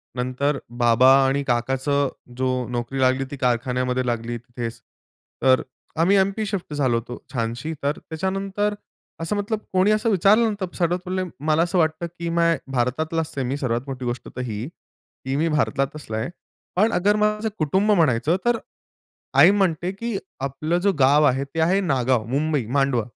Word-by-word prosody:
नंतर 130 +3 -1 0.2
बाबा 120 +2 +6 0.2
आणि 140 +1 0
काकाचं 135 +4 +1 0.3
जो 130 0 0 0.3
नोकरी 120 +3 -3
लागली, 130 +1 +2
ती 145 - -5
कारखान्यामध्ये 125 +1 0
लागली 120 0 -2
तिथेच. 120 -1 -7 0.6
तर 130 -1 +5
अ, 135 +4 -8
आम्ही 190 +4 +4
एम-पी 195 +3 +1
शिफ्ट 195 -6 -4
झालो 130 -5 +1
होतो 120 +1 -6 0.2
छानशी. 120 +6 -2
तर 145 +1 0
त्याच्यानंतर 195 +5 -2 0.5
असं 165 +5 -1
मतलब 205 +1 -2
कोणी 190 +3 +4
असं 215 +2 +2
विचारलं 210 +4 +4
ना 210 - -2
तर 185 -2 -4
सर्वात 175 0 +1
पहिले 185 +1 -1 0.2
मला 155 +1 +3
असं 175 +2 -1
वाटतं 160 0 +1
की 170 0 -2
मी 170 0 +1 0.3
भारतातलाच 155 +6 -1
आहे 135 - 0
मी, 135 +3 -2
सर्वात 120 -4 -1
मोठी 130 -2 -5
गोष्ट 120 0 -4
तर 125 - -3
ही, 115 -1 -4
की 135 -4 -9
मी 155 +4 +1
भारतातलाच 140 -2 -1
आहे. 110 - -3 0.5
पण 215 +5 +3 0.3
माझं 210 +1 +1
कुटुंब 190 +8 +2
म्हणायचं 155 - +3
तर 240 -1 +3 0.8
आई - - +8
म्हणते 185 -3 +1
की 225 +2 -4 0.2
"आपलं 155 +5 -1
जे 200 +1 +3
गाव 140 +3 +5
आहे, 135 -1 +2
ते 140 +4 -6
आहे 180 +5 +3
नागाव," 130 - +1
मुंबई, 145 0 0
मांडवा 135 -2 +1
145 Hz, 165 wpm, -23 LUFS, 125-185 Hz, 0.8 s, आई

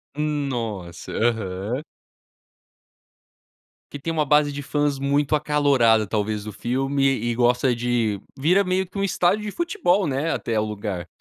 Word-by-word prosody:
Nossa, 120 - -3
aham. 110 +2 -1 2.1
Que 145 - -7
tem 165 - -3
uma 155 -2 +1
base 150 0 +3
de 145 - -5
fãs 145 0 0
muito 140 +2 +1
acalorada 140 -8 +3
talvez 105 0 -1
do 105 - -6
filme 135 +5 -1
e 120 -3 +1
gosta 125 +1 +2
de 115 -4 0 0.2
vira 175 +9 +3
meio 185 0 0
que 185 - -10
um 195 - 0
estádio 195 +2 +1
de 210 - -3
futebol, 340 - +1
né, 145 +4 -1
até 115 -2 -1
o - - +1
lugar. 100 -4 -4
135 Hz, 145 wpm, -23 LUFS, 110-150 Hz, 2.1 s, base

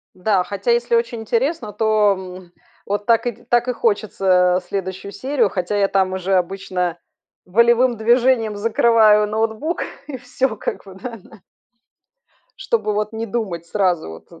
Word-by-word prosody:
Да, 185 0 +1
хотя, 200 +4 -3
если 235 0 +1
очень 235 0 0
интересно, 235 +1 -1
то, 215 -1 +2
м, 185 -1 -10 0.3
вот 205 +1 -2
так 230 0 +3
и 240 - 0
так 240 +2 0
и - - +2
хочется, 195 -5 +2
э, - - -5
следующую 190 0 -4
серию. 260 -3 0
Хотя 185 +2 -2
я 200 -1 +2
там 190 -1 +1
уже 190 +1 -1
обычно 180 -1 -1 0.5
волевым 235 +5 +3
движением 235 -1 +2
закрываю 215 -1 +4
ноутбук 220 +9 -2 0.2
и 290 - -6
всё, 250 -1 -2
как - - -5
бы, 190 - -11
да, 230 +5 -7
на 215 - -17 1.2
чтобы, 460 - -1
вот, 210 +1 -2
не 225 +1 -4
думать 195 -7 -4
сразу 180 - 0
вот, 80 0 -12
э, - - -15
210 Hz, 160 wpm, -20 LUFS, 190-235 Hz, 1.2 s, закрываю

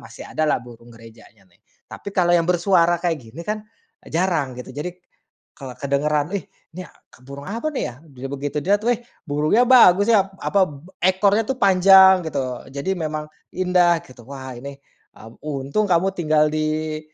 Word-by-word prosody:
masih 115 0 -12
ada 155 - -2
lah, - - +2
burung 120 -1 -15
gerejanya, 115 -2 -17
nih. 90 - -31 0.3
Tapi, - - -9
kalau 175 -1 +3
yang 170 - +1
bersuara 175 -1 +3
kayak 170 -2 0 0.2
gini 165 - -9
kan, 215 +2 -3 0.4
e - - -16
jarang, 165 -6 0
gitu. 125 +1 -9
Jadi, 175 +5 -7 0.5
kalau 135 -3 -8
kedengaran, 145 +2 0
"Wih, 200 - -3 0.3
nih 185 - -6
a - - -23 0.2
k - - -20
burung 140 +1 -10
apa 230 +9 -3
nih - - -3
ya?" 120 - -9
Dili 135 -3 -9
begitu 140 +1 -4
dilihat, 205 +6 +1
"Weh! 240 -1 +1 0.2
Burungnya 155 +10 +2
bagus, 205 -6 +6
ya!" 195 -3 +3
apa, 195 -2 +2
b 145 +3 -13
ekornya 195 +4 +2
tuh 265 - -1
panjang, 190 -1 +7
gitu. 130 -4 -4
Jadi 140 +7 -2
memang 155 -2 -4 0.3
indah, 180 -2 +3
gitu. 125 -2 -16
"Wah, 130 -2 -8
ini," 140 +3 -9 0.4
mmm, 115 +1 -14
"untung 145 +7 -2
kamu 185 +2 +2
tinggal 155 -2 +2
di 155 0 -2
155 Hz, 180 wpm, -21 LUFS, 140-185 Hz, 0.5 s, panjang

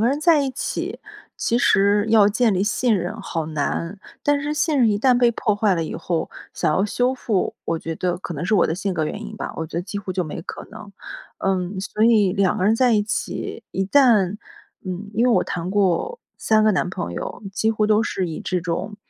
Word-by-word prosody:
个 225 - +3
人 280 +3 0
在 315 -1 +4
一 270 - -1
起， - - -4 0.4
其 235 - 0
实 205 0 +3
要 215 -2 +6
建 220 +1 +2
立 185 - +1
信 220 +1 +1
任 180 +5 -4
好 165 -5 -3
难， 160 +5 -3 0.2
但 290 -1 +2
是 295 +1 -2
信 305 -1 +1
任 235 -4 +5
一 205 - +1
旦 250 +2 +4
被 240 -1 +4
破 215 -2 0
坏 205 -2 +2
了 165 - -1
以 - - -6
后， 165 -2 -2 0.2
想 - - +1
要 190 - +2
修 245 +5 +1
复， 220 -7 -1
我 165 - -1
觉 165 0 -5
得 180 +1 -1
可 180 - -7
能 150 -1 -5
是 220 - +2
我 185 - +4
的 160 - -1
性 185 0 -3
格 160 - 0
原 - - -4
因 - - -9
吧， - - -5
我 160 - -3
觉 - - -8
得 170 - -1
几 205 +2 -5
乎 195 -2 -6
就 180 -1 0
没 150 - -6
可 - - -8
能。 215 -1 -11 0.5
嗯， 190 0 -1
所 210 +3 -3
以 215 -5 +4
两 195 -2 +1
个 185 - -1
人 215 +3 +4
在 245 -1 +3
一 205 - +3
起， 215 - -4
一 195 - -1
旦 210 -5 +4 0.5
嗯， 185 +3 -5
因 230 +4 +2
为 250 - +4
我 185 - +3
谈 180 +1 -4
过 205 - +1 0.2
3 215 -1 +3
个 215 - +4
男 180 - 0
朋 85 - -4
友， 85 - -6
几 220 +3 +1
乎 215 -1 +1
都 215 +1 +3
是 190 -5 -2
以 160 - -6
这 180 -1 -2
种， 180 +4 -3
205 Hz, 250 characters per minute, -22 LUFS, 180-225 Hz, 0.5 s, 要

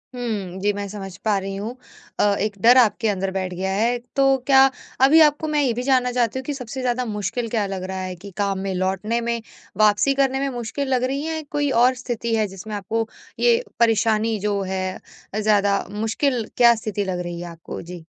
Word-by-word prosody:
हुँ। 205 -7 -4
जी, 205 +1 +2
मैं 200 0 -4
समझ 195 -2 -7
पा 210 -2 +3
रही 195 0 -5
हूँ। 215 +5 -5 0.4
अ, - - +4 0.2
एक 210 0 -1
डर 240 +4 +7
आपके 225 -2 +3
अंदर 195 -1 -1
बैठ 185 -1 -3
गया 190 +2 -2
है। 235 +4 +1 0.2
तो 275 - +4 0.2
क्या 270 -1 +7 0.4
अभी 310 +4 +6
आपको 300 +1 -3
मैं 300 -1 +1
ये 260 -4 +2
भी 245 +2 -3
जानना 255 -2 +2
चाहती 245 0 0
हूँ - - -7
कि 290 - -2
सबसे 260 -1 -6
ज़्यादा 250 0 0
मुश्किल 220 +2 -3
क्या 220 -2 0
लग 190 -1 -4
रहा 190 0 -4
है? 185 -1 -5
कि 195 +3 -11
काम 200 -2 0
में 195 0 -3
लौटने 190 +5 -1
में, 235 0 -2 0.4
वापसी 215 +6 +4
करने 265 0 +1
में 275 0 0
मुश्किल 240 +4 -3
लग 250 -1 +1
रही 270 +2 -1
है। 320 0 -2
या 315 - -3
कोई 290 -1 0
और 255 +1 +5
स्थिति 235 -2 -2
है 215 -1 +1
जिसमें 195 +3 -7
आपको 220 +3 -2 0.3
ये 475 0 +4 0.2
परेशानी 225 -1 +2
जो 205 0 -1
है 190 0 -2 0.6
ज़्यादा 205 -2 +2
मुश्किल 225 +3 -1
क्या 235 -1 +7
स्थिति 215 -2 -3
लग 185 -2 -2
रही 175 -1 -5
है 175 - -6
आपको? 170 -1 -8
जी। 175 -1 -9
220 Hz, 215 wpm, -22 LUFS, 195-250 Hz, 0.6 s, डर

